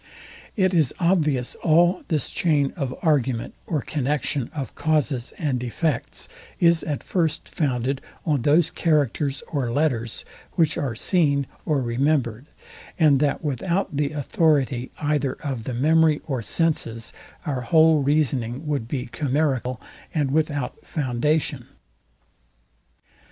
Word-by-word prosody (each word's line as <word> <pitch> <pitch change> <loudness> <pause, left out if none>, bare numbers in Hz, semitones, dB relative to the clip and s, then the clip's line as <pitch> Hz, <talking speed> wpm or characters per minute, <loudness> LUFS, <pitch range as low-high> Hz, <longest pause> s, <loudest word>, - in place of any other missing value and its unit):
It 190 -3 +2
is 155 -7 +2
obvious 155 -8 +2
all 175 +3 +4
this 155 -4 -1
chain 145 -5 +1
of 140 -6 -2
argument 130 -7 +1
or 155 -5 0
connexion 145 -2 -1
of 135 -7 -5
causes 150 -6 0
and 130 -6 -1
effects, 135 +2 -2 0.3
is 170 -1 +4
at 145 -2 -3
first 165 -5 -1
founded 130 -2 -1 0.2
on 150 -5 +1
those 150 +6 +3
characters 145 -3 0
or 135 -6 -1
letters, 120 -5 0 0.3
which 165 -4 +2
are 130 -5 -2
seen 140 - +2 0.2
or 145 -4 +1
remembered, 125 0 0 0.5
and 150 -5 +5
that 145 +2 0
without 170 +5 -1
the 145 0 +1
authority 145 -3 +1
either 145 -3 0
of 130 -7 -5
the 130 - -3
memory 155 +3 +4
or 130 -5 -2
senses 115 -5 0 0.3
our 140 -5 -2
whole 160 +3 +5
reasoning 135 -2 0
would 145 -6 -2
be 125 -1 -3
chimerical 130 -3 -1 0.4
and 145 -4 +1
without 145 -3 -1
foundation. 150 +2 -1
145 Hz, 125 wpm, -24 LUFS, 130-155 Hz, 0.5 s, and